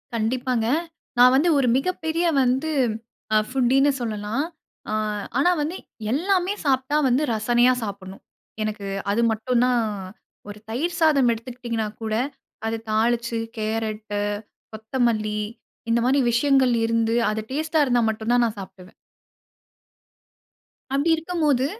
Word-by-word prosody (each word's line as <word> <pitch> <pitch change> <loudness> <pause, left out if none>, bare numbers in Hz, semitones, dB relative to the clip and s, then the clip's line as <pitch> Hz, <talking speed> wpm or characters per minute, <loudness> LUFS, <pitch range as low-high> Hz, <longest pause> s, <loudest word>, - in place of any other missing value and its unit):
கண்டிப்பாங்க. 235 +1 0 0.5
நான் 250 +1 +7
வந்து 325 +6 +3
ஒரு 260 -3 +2
மிகப்பெரிய 330 +1 -1 0.2
வந்து 260 +5 +1 0.8
ஃபுட்டின்னு 265 +2 +3
சொல்லலாம். 215 +3 -2 0.5
அ - - -1 0.4
ஆனா 345 +6 +4
வந்து, 310 +5 -2 0.4
எல்லாமே 370 +6 +1
சாப்பிட்டா 265 +1 +1
வந்து 260 +4 +2
ரசனையா 240 +3 +3
சாப்பிடணும். 195 -2 -7 0.4
எனக்கு 215 -2 -3 0.2
அது 220 +3 +1
மட்டும் 235 +2 0
தான். 250 -1 +2 0.7
ஒரு 205 +1 -9
தயிர் 325 +9 -2
சாதம் 290 -6 +4
எடுத்துக்கிட்டிங்கன்னா 230 -1 -4 0.2
கூட, 220 -1 -2 0.5
அத 225 0 -3
தாளிச்சு 230 +1 +1 0.2
கேரட்டு, 215 -1 -2 0.5
கொத்தமல்லி 220 -2 -1 0.5
இந்த 230 +1 +3
மாரி 265 +3 +3
விஷயங்கள் 260 0 +3
இருந்து. 230 0 +1
அது 215 +1 -2
டேஸ்ட்டா 315 +2 0
இருந்தா 245 -3 +2
மட்டும் 220 +2 -2
தான் 245 0 +4
நான் 220 -2 -3
சாப்பிடுவேன். 190 0 -11 2.0
அப்படி 285 +4 +1
இருக்கும்போது 310 -6 0
240 Hz, 115 wpm, -23 LUFS, 220-275 Hz, 2.0 s, நான்